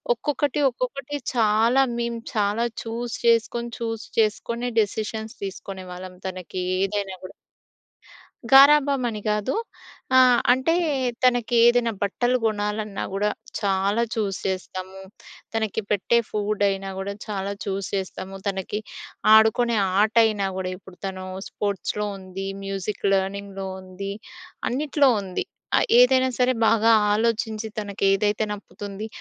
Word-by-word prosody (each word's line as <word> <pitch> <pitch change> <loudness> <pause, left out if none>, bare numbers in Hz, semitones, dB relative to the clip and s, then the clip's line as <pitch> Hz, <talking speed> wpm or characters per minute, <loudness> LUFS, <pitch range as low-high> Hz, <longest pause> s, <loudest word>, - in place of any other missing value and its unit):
ఒక్కొక్కటి 290 +3 -1
ఒక్కొక్కటి 265 +3 -4 0.2
చాలా 230 +3 +4
మేము 235 -1 -2
చాలా 210 +2 +1 0.2
చూజ్ 235 +1 -4
చేసుకొని 235 +1 +2
చూజ్ 225 -1 -3
చేసుకొని 235 +3 0
డిసిషన్‌స్ 220 +1 -4
తీసుకునేవాళ్ళం 185 -1 -7
తనకి 185 0 -5 0.2
ఏదైనా 195 -1 -3
కూడా. - - -9 1.2
గారాబం 280 0 +7
అని 215 -2 -5
కాదు. 210 +3 0 0.6
ఆ! - - +8 0.3
అంటే 260 +5 +1 0.5
తనకి 245 -1 +2
ఏదైనా 240 -1 +3
బట్టలు 240 +5 +1
కొనాలన్నా 210 -1 -1
కూడా 205 +2 +1 0.3
చాలా 200 +2 +1
చూజ్ 205 -4 -1
చేస్తాము. 190 0 -5 0.5
తనకి 220 -1 -1
పెట్టే 210 +3 +2
ఫుడ్ 210 0 -1
అయినా 195 0 -3
కూడా 195 +1 -3
చాలా 200 -2 -3
చూజ్ 195 -1 -3
చేస్తాము. 190 0 -4
తనకి 195 +1 -2 0.5
ఆడుకునే 220 +2 +4 0.2
ఆట 215 +1 +2
అయినా 210 -3 +1
కూడా 185 -1 -2
ఇప్పుడు 190 -1 -16
తను 185 -1 -5 0.2
స్పోర్ట్‌స్‌లో 205 +1 -2
ఉంది 190 0 -7 0.2
మ్యూజిక్ 195 +1 -4
లెర్నింగ్‌లో 195 0 -2
ఉంది. 190 +1 -6 0.6
అన్న‌టి‌లో 280 +1 +2
ఉంది. 185 -2 -3 0.3
ఆ - - +6 0.2
ఏదైనా 260 +1 +5
సరే 250 0 +3 0.2
బాగా 225 0 +4 0.2
ఆలోచించి 220 0 0
తనకు 205 -2 -5
ఏదైతే 205 +2 +1
నప్పుతుంది 205 0 -7
210 Hz, 115 wpm, -24 LUFS, 195-235 Hz, 1.2 s, ఆ